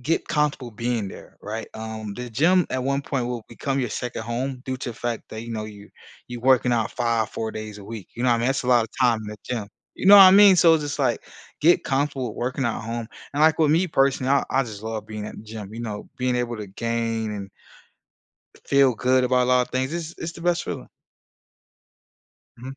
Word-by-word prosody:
get 155 +7 -1
comfortable 150 -5 0
being 115 -2 -2
there." - - -12
Right? 110 +2 -5
Um, 110 -2 -6
the 125 +2 -7
gym 165 +9 +3
at 130 - -1
one 140 +2 0
point 135 -4 -2
will 120 -2 -4
become 135 +3 -3
your 125 -4 -1
2nd 120 0 -4
home 125 +3 -4
due 130 0 -3
to 125 - -4
the - - -9
fact 120 -2 -3
that, 110 - -7
you 115 - -8
know, 110 -1 -3
you 105 -1 -12 0.4
you 120 -1 -6
working 125 -1 +3
out 115 -2 0
5, 115 -3 0
4 110 -1 -4
days 110 -1 -7
a 100 - -11
week. 110 -4 -8
You 120 - -3
know 125 - +3
I 120 - +3
mean? 115 - 0
That's 135 +1 0
a 125 - -4
lotta 120 -3 +4
time 120 -3 +4
in 105 - -7
the 105 - -7
gym. 115 -5 -4 0.3
You - - -4
know 205 +1 +10
what 195 - +11
I 185 - +10
mean? 200 0 +8
So 170 -2 +6
it's 155 - 0
just 145 0 -4
like, 130 -4 0 0.4
get 170 +3 +4
comfortable 135 -4 -1
working 130 +2 -2
at 115 - -2
home, 115 +1 -4 0.3
and, 145 - -2
like, 160 0 +5
with 155 -2 +4
me, 170 +4 +3
personally, 135 -3 +1
I 140 - +3
I 135 +1 +2
just 110 -4 -8
love 110 -1 -5
being 105 -1 -6
at - - -9
the - - -10
gym, 110 -1 -9
you 115 - -6
know, 105 -3 -6
being 125 -1 0
able 120 -1 -2
to 105 -1 -6
gain 115 +1 -2
and 100 -2 -6 1.2
feel 140 -2 +4
good 125 +2 +2
about 125 0 +3
a 125 - -2
lotta 125 -1 +3
things. 130 +2 -1
It's 170 -1 -5
it's 165 +1 -5
the 170 - -12
best 175 -1 +1
feeling. - - -6 1.7
Mhm. 130 +3 -9
125 Hz, 235 wpm, -24 LUFS, 110-135 Hz, 1.7 s, what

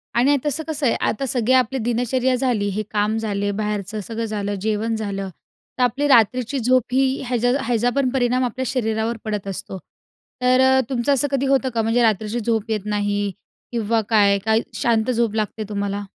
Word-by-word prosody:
आणि 270 +5 +4
तसं 295 +2 -1
कसं 305 -2 -2
आहे 235 - +3
आता 250 +5 -2
सगळी 245 0 +1
आपली 260 0 +2
दिनचर्या 245 +2 0
झाली, 245 -5 0
हे 210 +2 -2
काम 210 +1 +1
झाले, 205 -2 -1
बाहेरचं 210 0 -3
सगळं 230 0 -3
झालं, 205 -2 -3
जेवण 220 +2 -1
झालं. 200 -3 -4 0.5
तर 255 - +2
आपली 260 +4 +1
रात्रीची 255 +1 +3
झोप 255 +1 +4
ही 265 +1 +2
ह्याच्या 245 0 +1
ह्याचा 240 0 +1
पण 275 -2 +2
परिणाम 255 -1 +1
आपल्या 255 +2 -3
शरीरावर 225 -2 -1
पडत 210 -2 -3
असतो. 195 0 -6 0.6
तर 255 +1 +4
अ, 265 0 +5
तुमचं 260 +1 +1
असं 280 +1 +1
कधी 275 0 0
होतं 270 -1 +2
का 230 - +1
म्हणजे 225 +2 +1
रात्रीची 220 +1 +1
झोप 225 -1 -1
येत 210 -2 -2
नाही 205 -1 -1 0.4
किंवा 230 -1 0
काय 205 -3 +4
काय 220 0 +3
शांत 235 -2 +1
झोप 230 -3 0
लागते 215 0 -2
तुम्हाला? 200 0 -2
230 Hz, 180 wpm, -21 LUFS, 210-255 Hz, 0.6 s, अ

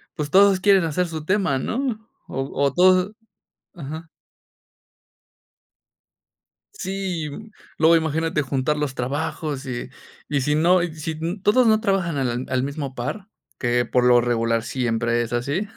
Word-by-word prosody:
pues, 150 -3 -3
todos 195 -1 +6
quieren 195 -3 +5
hacer 175 +3 0
su 155 -2 -6
tema, 190 -8 +1
¿no? 235 - -3 0.2
O 135 - -3
o 140 -1 +1
todos 185 +2 +4 0.6
ajá. 160 +1 -7 2.7
Sí, 185 - -3 0.5
luego 165 +1 +6
imagínate 160 -1 0
juntar 135 +2 -1
los 145 -3 -2
trabajos, 145 +2 -3
y 120 -1 -5 0.4
y 145 -2 0
si 150 +3 +1
no, 175 +3 +4
si 160 -2 -4
n 165 +5 -4
todos 240 +4 +4
no 215 0 +4
trabajan 195 -7 0
al 125 -1 -1
al 130 -1 0
mismo 140 -2 -5
par, 190 - -5 0.3
que 120 0 +1
por 125 - +1
lo 120 -1 +6
regular 115 -1 0
siempre 120 -1 0
es 115 - -6
así. 140 - -1
155 Hz, 140 wpm, -22 LUFS, 130-185 Hz, 2.7 s, todos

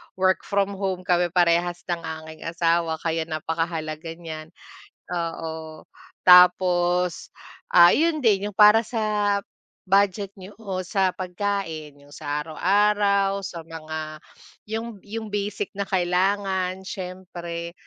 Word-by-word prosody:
work 185 -1 +1
from 200 -1 +1
home 190 -2 -2
kami 175 -1 +2
parehas 175 0 +1
ng 170 - -1 0.2
aking 160 +1 -9
asawa 165 -1 +1
kaya 165 -1 -1
napakahalaga 160 0 -3
niyan. 160 -2 -8 0.7
Oo, 160 -2 -5 0.4
tapos, 180 -1 +5 0.4
ah, 175 0 +7
'yon 325 0 +2
din 205 -2 +3
'yong 205 - -15
para 210 +1 +8
sa 210 -3 0 0.5
budget 200 0 +2
nyo 190 +2 -11
o 185 -3 -4
sa 190 +1 +1
pagkain 180 -5 -3
'yong 145 0 -18
sa 145 +2 -3
araw-araw 200 +3 +2
sa 175 -4 -7
mga 155 -1 -7 0.5
'yong 225 -2 -5
'yong 215 0 -7
basic 205 -1 -3
na 200 - -4
kailangan 190 +1 0
siyempre. 175 -3 -6
180 Hz, 120 wpm, -24 LUFS, 165-200 Hz, 0.7 s, para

